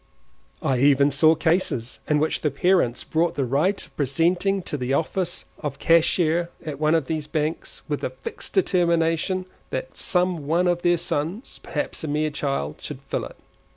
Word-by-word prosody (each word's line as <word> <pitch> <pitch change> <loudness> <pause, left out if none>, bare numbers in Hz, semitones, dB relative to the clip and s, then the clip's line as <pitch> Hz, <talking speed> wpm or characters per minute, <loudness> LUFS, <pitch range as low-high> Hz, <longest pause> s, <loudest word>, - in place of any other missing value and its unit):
I 130 -2 +1
even 140 +1 +5
saw 155 +4 +5
cases 155 -7 0
in 150 - +4
which 155 +2 0
parents 175 -7 +2
bought 165 +1 0
the 140 - 0
right 150 +11 +1
of - - -24
presenting 175 +7 +1
to - - -4
the 130 -1 0
office 175 +4 -1
of 145 -3 -4
cashier 170 0 +3 0.2
at 145 -3 -5
one 155 +1 +3
of 160 -4 +1
these 155 0 -3
banks, 155 +1 -3
with - - -2
the - - -1
fixed 460 -3 -6
determination 175 - +2 0.2
that 130 0 -4
some 180 -5 0
one 175 +4 +2
of 175 -1 +1
their 175 0 +3
sons 170 - -3
(perhaps - - -4
a - - -2
mere 150 +1 0
child) 135 - -2
should - - -7
fill - - -1
it. - - -11
160 Hz, 170 wpm, -24 LUFS, 145-175 Hz, 0.2 s, even